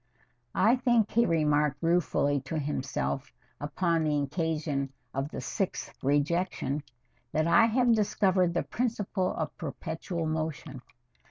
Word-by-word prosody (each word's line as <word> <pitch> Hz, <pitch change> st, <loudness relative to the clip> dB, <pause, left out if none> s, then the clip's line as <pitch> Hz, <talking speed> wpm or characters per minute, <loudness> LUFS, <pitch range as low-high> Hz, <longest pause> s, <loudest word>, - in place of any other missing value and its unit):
"I 225 Hz, +6 st, +4 dB
think," 240 Hz, -4 st, +2 dB
he 235 Hz, +1 st, +3 dB
remarked 150 Hz, -2 st, +2 dB
ruefully 165 Hz, -4 st, +2 dB
to 160 Hz, +4 st, -3 dB
himself 140 Hz, -1 st, -2 dB, 0.3 s
upon 165 Hz, +2 st, 0 dB
the 150 Hz, -1 st, +1 dB
occasion 150 Hz, -2 st, -1 dB, 0.2 s
of 135 Hz, +3 st, -2 dB
its -, -, -5 dB
sixth 195 Hz, -4 st, -3 dB
rejection, 145 Hz, 0 st, 0 dB, 0.5 s
"that 155 Hz, 0 st, +2 dB
I 170 Hz, +7 st, +6 dB
have 240 Hz, +1 st, +3 dB
discovered 190 Hz, -4 st, +2 dB
the -, -, +1 dB
principle 210 Hz, -6 st, -1 dB
of 160 Hz, -, -3 dB
perpetual 160 Hz, +3 st, -4 dB
motion. 155 Hz, -3 st, -3 dB
160 Hz, 120 wpm, -29 LUFS, 145-190 Hz, 0.5 s, I